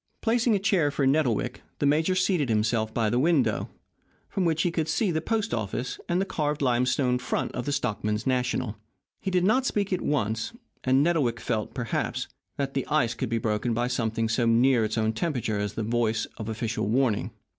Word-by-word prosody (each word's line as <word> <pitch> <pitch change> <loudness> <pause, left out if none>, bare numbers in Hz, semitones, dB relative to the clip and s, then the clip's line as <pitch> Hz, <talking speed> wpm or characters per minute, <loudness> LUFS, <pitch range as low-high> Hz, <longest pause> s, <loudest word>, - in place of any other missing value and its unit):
Placing 235 -1 +2
a - - +3
chair 190 -7 +2
for 140 -1 0
Nettlewick, 135 -5 +1 0.2
the - - 0
major 160 +6 +3
seated 180 -7 +1
himself 110 0 +1
by 115 -1 +1
the 120 +3 +1
window, 155 -1 +2 0.6
from 190 - -1
which 160 -1 +2
he 175 - +1
could 160 -2 -1
see 205 0 +1
the 160 -1 0
post 225 +4 -1
office 110 +4 -3
and 175 +1 +2
the 195 - +1
carved 150 -5 -1
limestone 125 0 +2
front 125 - -2
of 125 - -4
the - - +1
Stockmen's 105 -4 -1
National. 125 -4 0 0.4
He - - -3
did 180 -1 +2
not 245 +7 +3
speak 200 -2 0
at 180 - -1
once, 110 - -1 0.3
and 130 +2 +4
Nettlewick 145 -9 +1
felt, 110 -3 -2
perhaps, 120 -2 -2 0.3
that 135 -1 -2
the 135 - -2
ice 145 -7 +2
could 125 0 -3
be 115 - 0
broken 110 +1 0
by 120 +1 +1
something 115 -2 0
so 115 +2 +1
near 120 +1 +4
its 110 +1 -2
own 110 0 +1
temperature 115 -5 -1
as 105 0 -2
the 110 - -3
voice 115 0 0
of 110 0 -5
official 110 -2 -2
warning. 120 -1 +1
125 Hz, 200 wpm, -27 LUFS, 115-160 Hz, 0.6 s, and